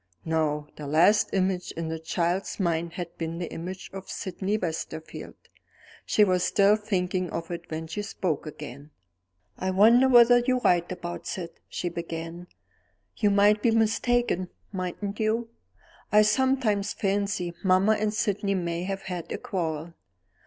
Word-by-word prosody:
No: 155 -2 0
the 150 - -6
last 175 +8 +4
image 185 -1 0
in 165 -1 -4
the 160 0 -3
child's 175 +5 -1
mind 170 -2 0
had 175 -2 -6
been 165 0 -3
the 175 -1 -5
image 185 +3 -7
of 195 -1 -8
Sydney 195 +2 -2
Westerfield. 160 -3 -5 0.7
She 210 - +4
was 185 -3 +2
still 200 +1 +4
thinking 185 -4 -1
of 165 +1 -5
it 170 -1 -6
when 160 0 -4
she 185 +6 -4
spoke 175 -6 -3
again. 145 -1 -9 0.7
"I 185 - -1
wonder 230 +7 +6
whether 245 -1 +7
you're 255 +1 +1
right 175 -4 +2
about 175 -1 -6
Syd?" 170 -3 -4 0.2
she 180 - -3
began. 170 0 -6 0.7
"You 210 - +3
might 205 +1 +4
be 240 - +3
mistaken, 225 -3 +1 0.2
mightn't 195 +2 -4
you? 225 +2 0 0.6
I 210 0 +7
sometimes 215 -3 +1
fancy 195 -3 -1
mamma 190 +2 +4
and 215 0 +1
Sydney 205 -3 0
may 170 -1 -2
have 195 0 -4
had 180 -3 -5
a - - -2
quarrel. 165 -3 -3
185 Hz, 150 wpm, -27 LUFS, 170-210 Hz, 0.7 s, whether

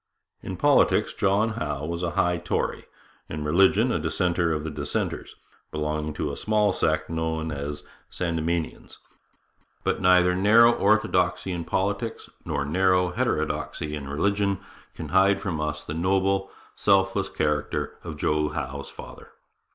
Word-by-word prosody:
In - - -6
politics - - +3
John 100 +3 +2
Howe 75 -9 -3
was 85 +2 -3
a 90 - 0
high 90 0 +2
Tory; - - -2 0.4
in 75 0 -4
religion 95 +9 +4
a 85 - 0
dissenter 85 +2 0
of 75 -1 -1
the 80 - -4
dissenters, - - -3 0.3
belonging 75 0 -3
to 75 -1 -2
a - - -6
small 105 -2 +2
sect 80 -3 0
known 80 -1 -2
as 75 +1 -5 0.3
Sandemanians. 85 -1 -3 0.9
But - - 0
neither 90 -1 +5
narrow 110 +5 +6
orthodoxy 95 -4 +1
in 85 -2 -4
politics 100 +6 -2
nor 70 0 -2
narrow 90 +3 +2
heterodoxy 75 -3 -2
in 70 -2 -5
religion 100 +6 +1 0.4
can - - -7
hide 95 +1 +4
from 85 -6 -3
us 75 0 -3
the - - -6
noble, 95 +3 +1 0.3
self 95 -1 +3
less 95 -1 -1
character 75 -1 -2
of 80 -3 -7
Joe 75 0 +1
Howe's 70 -3 -5
father. - - -11
85 Hz, 145 wpm, -25 LUFS, 75-95 Hz, 0.9 s, narrow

